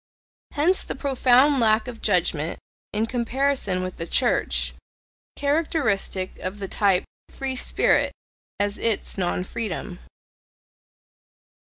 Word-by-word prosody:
Hence 340 +6 +2
the - - -5
profound 270 0 +4
lack 220 0 +3
of 240 -2 -8
judgment, 170 -5 +1 0.3
in 215 +1 0
comparison 245 -5 0
with 185 0 -5
the 165 - -4
Church, - - +1 0.6
characteristic 280 - 0
of 185 +2 -5
the 200 -1 -5
type 195 -2 +2 0.3
"free 270 -1 -3
spirit" - - +2 0.5
as 205 0 +1
ITS 220 -3 -1
non 180 0 0
freedom. 185 -2 -4
215 Hz, 110 wpm, -24 LUFS, 185-265 Hz, 0.6 s, profound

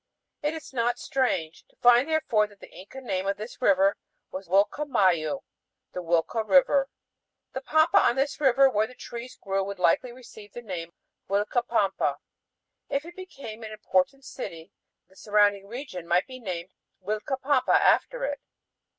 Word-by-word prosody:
It 295 +2 -1
is 315 -3 -9
not 240 -1 0
strange 180 -12 -1
to - - -31
find 245 +3 +5
therefore 230 -9 +2
that 205 -1 -20
the - - -13
Inca 205 +8 -11
name 195 -6 -2
of 200 0 0
this 215 +5 -9
river 195 -3 +4 0.3
was 190 0 -7
Uilca 200 - +2
mayu: 185 - +2 0.5
the 180 - -4
"huilca 170 +6 0
river." 275 +3 +4 0.6
The 265 - -4
pampa 315 +7 +4
on 240 - +3
this 275 +2 -1
river 270 0 +5
where 215 -4 +1
the 255 - -15
trees 240 +1 -8
grew 195 -1 -1
would 200 0 -5
likely 180 +8 +2
receive 230 -4 -14
the 240 - -8
name 170 -5 -6 0.4
Uilca 205 +5 +1
pampa. 200 -5 +1 0.7
If 280 +2 -1
it 345 +1 -11
became 275 - -9
an 220 -1 -7
important 215 +6 0
city, 165 -12 -8 0.3
then - - -48
the 190 - -23
surrounding 205 -2 +2
region 225 - -7
might 175 +2 +2
be 255 -1 -10
named 185 -5 -5 0.3
Uilcapampa 260 +6 0
after - - +3
it. - - -3
220 Hz, 165 wpm, -26 LUFS, 195-265 Hz, 0.7 s, find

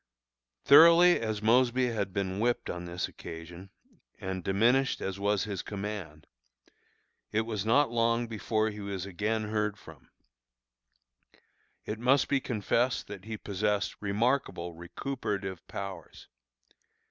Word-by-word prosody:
Thoroughly 170 +4 +8
as 110 -2 -3
Mosby 125 +2 +3
had 100 -4 -2
been 95 0 -2
whipped 120 +2 0
on 90 0 -6
this 85 +1 -3
occasion, 85 +3 -10 0.5
and 95 -3 -4
diminished 120 +8 +2
as 95 0 -4
was 100 -1 +1
his 100 -4 -4
command, 100 -7 -6 1.1
it 110 - +2
was 110 -2 -4
not 135 +3 +4
long 115 0 +1
before 110 0 -1
he 105 - -9
was 100 -2 -4
again 105 +3 -2
heard 105 -1 -1
from. 80 -8 -15 1.8
It 105 +1 -4
must 130 +3 +3
be 140 - +3
confessed 120 +2 0
that 100 -2 -8
he 110 0 -5
possessed 105 0 -1
remarkable 105 -4 0
recuperative 95 - -5
powers. 95 -5 -8
105 Hz, 125 wpm, -29 LUFS, 95-115 Hz, 1.8 s, Thoroughly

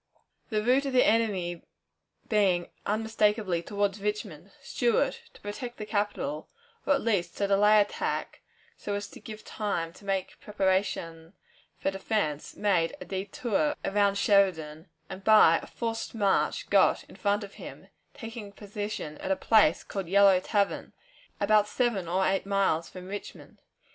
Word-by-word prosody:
The 215 -3 0
route 260 +4 +3
of 270 - -3
the 250 - +5
enemy 190 -7 +1 0.7
being 190 -5 +2 0.2
unmistakably 210 -4 +1
toward 200 +2 -1
Richmond, 200 -4 -4
Stuart, 240 -4 0
to - - -16
protect 240 +4 -6
the 215 - -5
capital, 210 +7 -2 0.4
or 285 - +5
at - - -2
least 195 -7 0
to 200 - +1
delay 210 +2 +5
attack, 205 0 -2 0.3
so 205 - -4
as 205 0 -4
to - - -12
give 215 -1 -10
time 170 -6 -3
to - - -17
make 195 -1 -3
preparation 190 -4 -1 0.4
for 195 - -1
defense, 195 -6 -2
made 185 -6 +1
a - - -8
détour 205 +8 -1
around 200 0 +2
Sheridan, 180 -6 +1 0.2
and 190 +1 -9
by 215 -6 +6
a - - -11
forced 230 -1 -4
march 210 - +1
got - - +4
in - - -16
front 205 +1 0
of 200 - -10
him, - - -10 0.3
taking 225 -4 -8
position 205 -6 -6
at - - -5
a 190 - +3
place 210 -6 +3
called 195 -3 -5
Yellow 195 -1 +6
Tavern, 200 +1 -1 0.5
about 210 0 +4
seven 215 -6 0
or 185 +3 +1
eight 195 +1 0
miles 195 -5 +1
from 185 -1 -10
Richmond. 205 +1 -9
205 Hz, 150 wpm, -28 LUFS, 190-215 Hz, 0.7 s, by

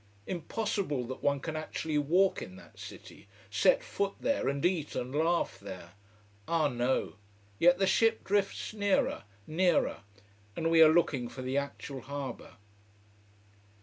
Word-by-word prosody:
Impossible 185 - -2
that 130 +2 -7
one 140 0 +1
can 160 +3 -5
actually 155 0 -2
walk 180 +7 +2
in 185 - -8
that 190 - -16
city: - - -11 0.2
set - - +4
foot 200 - -2
there 280 - 0
and 140 +3 -1
eat 175 -5 0
and 125 +2 -3
laugh 165 +3 +1
there. 95 -3 -9 0.6
Ah, 165 -3 +2
no! 125 -5 -1 0.4
Yet 175 +1 +6
the 195 - +2
ship 225 +3 +3
drifts 200 +1 -1
nearer, 205 - +1 0.2
nearer, 175 +1 +2 0.6
and 165 0 0
we 165 -1 +6
are 155 -1 +9
looking 145 -7 +2
for 130 - -8
the 130 +1 -2
actual 140 -1 -6
harbour. 140 +1 -6
160 Hz, 145 wpm, -31 LUFS, 140-185 Hz, 0.6 s, are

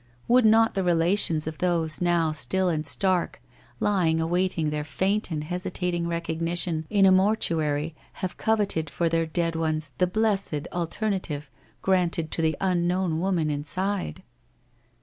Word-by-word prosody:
Would 245 -1 +5
not 225 +1 +4
the 195 - -1
relations 170 -2 +2
of 160 0 -6
those 170 -3 0
now 170 -2 +2
still 185 +4 0
and 155 -2 -1
stark, 185 - 0 0.4
lying 175 -6 +2
awaiting 170 -1 0
their 150 0 -2
faint 190 +9 -1
and 155 -3 -3
hesitating 180 0 -2
recognition 170 -1 -2
in 200 -2 +4
a 190 - +6
mortuary, 165 -6 +1 0.2
have 185 -2 -5
coveted 205 -8 0
for 170 - -1
their 165 0 0
dead 165 +1 -1
ones 155 -3 -1
the 180 - +3
blessed 195 -6 0
alternative 170 -5 -3 0.3
granted 175 -4 +1
to - - -1
the 160 -1 +1
unknown 180 -2 0
woman 170 -4 0
inside? 170 - -2
170 Hz, 140 wpm, -25 LUFS, 160-190 Hz, 0.4 s, a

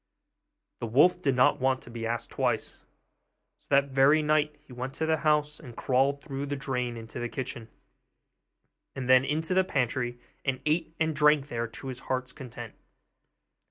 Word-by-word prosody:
The 115 - -3
wolf 160 +10 +4
did 135 -6 +1
not 125 0 +4
want 130 0 +1
to 120 - -12
be 115 -1 -4
asked 115 0 -3
twice; - - -1 0.8
so - - -32
that 140 0 +4
very 135 +3 +4
night 150 0 +2
he 125 - -13
went 130 +2 -5
to 160 - -1
the 160 0 +2
house 150 -1 +1
and 125 -7 -12
crawled 135 +2 +1
through 140 -2 -4
the 145 - -2
drain 125 -3 -3
into 115 -1 -8
the 120 0 -3
kitchen, 120 -3 -5 1.3
and 130 -2 -4
then 130 0 +6
into 155 +5 -1
the 190 0 +4
pantry, 120 -6 -1 0.2
and 130 -2 -1
ate 160 +1 0
and 160 -1 +1
drank 150 -1 +4
there 115 -2 -2
to 115 +4 -9
his 125 -1 -6
heart's 130 -1 -3
content. 120 -4 -9
135 Hz, 175 wpm, -28 LUFS, 125-150 Hz, 1.3 s, then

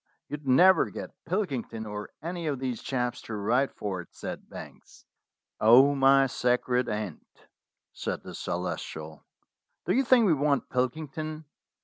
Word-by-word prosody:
"You'd 150 -1 -6
never 180 +9 +6
get - - -7 0.2
Pilkington 135 - -2
or 105 0 -6
any 170 0 -4
of 145 -2 -1
these 125 -2 -3
chaps 125 -2 -2
to 115 - -6
write 120 +7 +1
for 95 -3 -4
it," 85 - -14
said - - -7
Banks. - - -12 0.5
"Oh, 125 +6 +7
my 135 0 +5
sacred 125 0 +1
aunt!" 105 -6 -4 0.7
said - - -4
the - - -9
Celestial, 80 -1 -5 0.6
"do - - +1
you 265 - +3
think 245 -2 +5
we 180 - +5
want 145 -1 +1
Pilkington? 155 +4 -3
130 Hz, 140 wpm, -28 LUFS, 115-155 Hz, 0.7 s, Oh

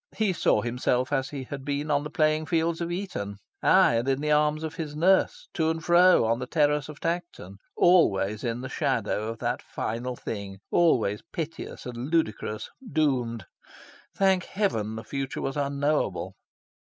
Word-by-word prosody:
He 215 -4 +2
saw - - +2
himself 125 +2 0
as 135 -1 0
he 140 -2 -5
had 135 +1 -7
been 145 +2 -2
on 145 0 +2
the 150 - -5
playing 155 +1 +1
fields 165 0 0
of 170 0 -2
Eton; 175 - -4 0.2
aye! 115 - +5
and 120 +3 -1
in 135 0 +1
the 150 +1 -1
arms 150 +1 +2
of 160 - -4
his 155 -4 -5
nurse, 190 - +2
to 160 -2 +1
and 160 0 -3
fro 175 -5 +6
on 115 +1 +1
the 125 - -4
terrace 150 0 +1
of 150 - -9
Tankerton 170 - -4 0.2
always 105 - +3
in 120 0 -2
the 130 - -5
shadow 115 -7 -1
of 115 0 -4
that - - -2
final 120 +3 -4
thing, 100 -4 -6
always 115 -12 +3
piteous 165 -2 -6
and 125 +2 -5
ludicrous, 110 -9 -1 0.2
doomed. 125 - 0 0.7
Thank 190 -2 +3
heaven 110 - -1
the 110 - -6
future 135 0 -4
was 135 - -3
unknowable? 140 -10 -1
145 Hz, 170 wpm, -27 LUFS, 115-160 Hz, 0.7 s, fro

